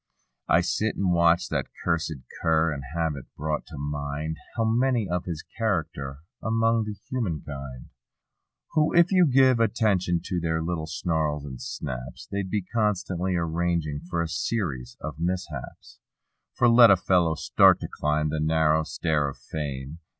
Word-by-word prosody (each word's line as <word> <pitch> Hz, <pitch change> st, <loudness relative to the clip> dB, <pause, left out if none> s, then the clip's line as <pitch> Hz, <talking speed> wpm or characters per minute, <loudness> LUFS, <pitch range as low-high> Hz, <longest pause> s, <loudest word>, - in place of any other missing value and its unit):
I 85 Hz, -, +5 dB
sit 90 Hz, +5 st, -1 dB
and 95 Hz, -2 st, +1 dB
watch 85 Hz, +1 st, +4 dB
that -, -, -1 dB, 0.2 s
cussed 85 Hz, -2 st, 0 dB, 0.3 s
cur 80 Hz, -1 st, +2 dB
and 70 Hz, -, -5 dB
have 80 Hz, -3 st, 0 dB
it 70 Hz, -, -8 dB
brought 75 Hz, 0 st, -2 dB
to 80 Hz, -, -9 dB
mind 75 Hz, +2 st, -3 dB, 0.2 s
How 115 Hz, -, +2 dB
many 120 Hz, -1 st, +2 dB
of 90 Hz, 0 st, -2 dB
his 85 Hz, -3 st, -5 dB
character 80 Hz, -10 st, -3 dB, 0.2 s
among 115 Hz, 0 st, +2 dB
the 105 Hz, -1 st, -5 dB, 0.2 s
human 100 Hz, -, -1 dB
kind 70 Hz, -3 st, -8 dB, 0.8 s
Who, 155 Hz, 0 st, +2 dB
if 170 Hz, +1 st, +5 dB
you 180 Hz, -3 st, +5 dB
give 130 Hz, -2 st, +5 dB
attention 100 Hz, -7 st, +2 dB
to 90 Hz, -, -2 dB
their 80 Hz, -1 st, 0 dB
little 80 Hz, -2 st, -3 dB
snarls 80 Hz, -2 st, -1 dB
and 65 Hz, -3 st, -8 dB
snaps. 65 Hz, 0 st, -6 dB
They'd 100 Hz, -1 st, -3 dB
be 105 Hz, 0 st, -1 dB
constantly 95 Hz, -4 st, -1 dB
arranging 85 Hz, -3 st, -1 dB
for 85 Hz, -2 st, 0 dB
a -, -, -3 dB
series 80 Hz, -, -3 dB
of 75 Hz, -3 st, -5 dB
mis¬ 90 Hz, +3 st, -1 dB
haps. 70 Hz, -5 st, -9 dB, 0.6 s
For 120 Hz, -, +4 dB
let 115 Hz, 0 st, +8 dB
a 100 Hz, -, +8 dB
fellow 85 Hz, -3 st, +2 dB
start -, -, +5 dB
to -, -, -3 dB
climb 75 Hz, +1 st, 0 dB
the 80 Hz, +1 st, -2 dB
narrow 80 Hz, 0 st, +3 dB
stair 75 Hz, -1 st, 0 dB
of 70 Hz, -, -10 dB
fame. 70 Hz, 0 st, -5 dB
85 Hz, 165 wpm, -26 LUFS, 75-100 Hz, 0.8 s, let